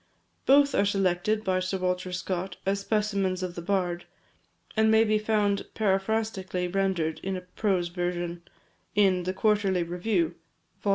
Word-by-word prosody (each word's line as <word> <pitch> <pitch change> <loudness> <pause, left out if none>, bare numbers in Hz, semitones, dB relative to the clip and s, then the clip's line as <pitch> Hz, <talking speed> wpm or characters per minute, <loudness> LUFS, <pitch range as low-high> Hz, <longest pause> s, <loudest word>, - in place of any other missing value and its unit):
Both 280 +1 +6
are - - +3
selected 200 +1 +1
by 185 -2 +1
Sir 185 +1 -2
Walter 180 0 -1
Scott 180 0 -3
as 195 +1 +1
specimens 200 -3 0
of 180 -1 -3
the 170 - -6
bard, 175 -2 -1 0.7
and 220 0 +4
may 220 0 +6
be 215 -1 +2
found 210 -2 +1
paraphrastically 195 -2 0
rendered 180 -4 0
in 195 0 -3
a - - -6
prose 180 -1 -1
version, 175 -1 -3 0.5
in 190 -3 +3
the 185 - -1
Quarterly 200 -3 +2
Review, 175 0 0 0.5
vol. 205 - -1
190 Hz, 150 wpm, -27 LUFS, 180-210 Hz, 0.7 s, Both